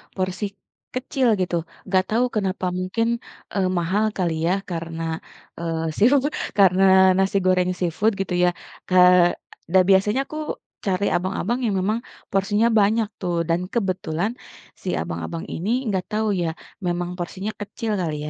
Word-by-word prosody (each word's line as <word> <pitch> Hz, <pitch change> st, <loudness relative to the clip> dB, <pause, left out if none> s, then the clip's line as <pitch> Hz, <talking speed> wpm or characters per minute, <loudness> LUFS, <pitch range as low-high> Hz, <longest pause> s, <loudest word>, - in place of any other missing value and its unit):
porsi 185 Hz, +2 st, -2 dB, 0.5 s
kecil, 260 Hz, 0 st, 0 dB
gitu. 180 Hz, -1 st, 0 dB, 0.3 s
Enggak 185 Hz, -1 st, +3 dB
tahu 235 Hz, +3 st, +3 dB
kenapa 195 Hz, -3 st, -1 dB
mungkin, 190 Hz, +5 st, 0 dB, 0.5 s
eee, 190 Hz, -2 st, +2 dB
mahal 190 Hz, +6 st, +1 dB
kali 175 Hz, -3 st, +1 dB
ya 180 Hz, -, +3 dB, 0.2 s
karena, 165 Hz, -1 st, -4 dB, 0.6 s
eee, 165 Hz, -1 st, -2 dB
seafood 275 Hz, +6 st, +4 dB, 0.3 s
karena 190 Hz, -1 st, +6 dB, 0.3 s
nasi 195 Hz, +1 st, +2 dB
goreng 185 Hz, -1 st, +3 dB
seafood 180 Hz, +5 st, +1 dB
gitu 195 Hz, -2 st, -2 dB
ya. 180 Hz, -, +5 dB, 0.4 s
Ke 185 Hz, -, +3 dB, 0.8 s
dah 190 Hz, -1 st, +7 dB
biasanya 210 Hz, +6 st, +4 dB
aku 310 Hz, -, -7 dB, 0.5 s
cari 190 Hz, +2 st, +1 dB
abang-abang 190 Hz, +6 st, -1 dB
yang 210 Hz, -3 st, +1 dB
memang 210 Hz, +5 st, 0 dB, 0.3 s
porsinya 205 Hz, +3 st, +2 dB
banyak 215 Hz, +2 st, +3 dB
tuh, 175 Hz, -2 st, -1 dB
dan 165 Hz, +1 st, +2 dB
kebetulan 185 Hz, -3 st, -1 dB, 0.5 s
si -, -, -2 dB
abang-abang 85 Hz, -, -5 dB
ini 185 Hz, +6 st, -3 dB, 0.2 s
enggak 190 Hz, -5 st, -1 dB
tahu 215 Hz, +1 st, 0 dB
ya, 170 Hz, -, 0 dB, 0.4 s
memang 175 Hz, 0 st, -1 dB
porsinya 190 Hz, +4 st, -4 dB
kecil 215 Hz, +2 st, -4 dB
kali, 160 Hz, -3 st, -2 dB
190 Hz, 140 wpm, -23 LUFS, 175-210 Hz, 0.8 s, dah